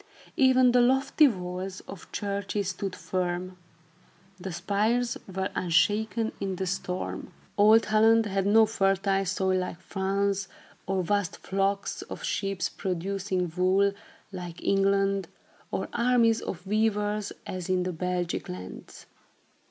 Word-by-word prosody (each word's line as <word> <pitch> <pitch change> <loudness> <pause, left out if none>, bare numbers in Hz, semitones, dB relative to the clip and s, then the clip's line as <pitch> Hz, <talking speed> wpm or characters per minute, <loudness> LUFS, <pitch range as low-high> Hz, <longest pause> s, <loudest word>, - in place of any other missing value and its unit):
Even 260 -2 +5
the 245 0 +5
lofty 265 +4 +4
walls 185 -3 -4
of 195 -2 -11
churches 200 -1 -2
stood 190 0 -4
firm. 180 0 -3 0.8
The 185 +1 -5
spires 210 +7 0 0.2
were 190 +1 -2
unshaken 215 +6 +1
in 195 -1 -2
the 190 - -3
storm. 185 0 -4 0.2
Old 215 +2 +6
Holland 225 +1 +4
had 195 -1 0
not 220 +1 +5
fertile 195 -1 +1
soil 190 0 +1
like 180 -1 -4
France, 195 +1 -1 0.4
or 190 -1 0
vast 205 0 0
flocks 195 +1 -1
of - - -8
sheep, 195 -2 -2 0.2
producing 185 -1 -2
wool, 190 +2 +3 0.4
like 175 -3 -7
England, 195 0 +2 0.4
or - - -2
armies 235 -2 +3
of 180 0 -6
weavers, 210 0 0
as 185 -1 -5
in 185 -1 +2
the 180 0 -3
Belgic 180 +1 -2
lands. 90 +1 -9
195 Hz, 125 wpm, -27 LUFS, 185-210 Hz, 0.8 s, Old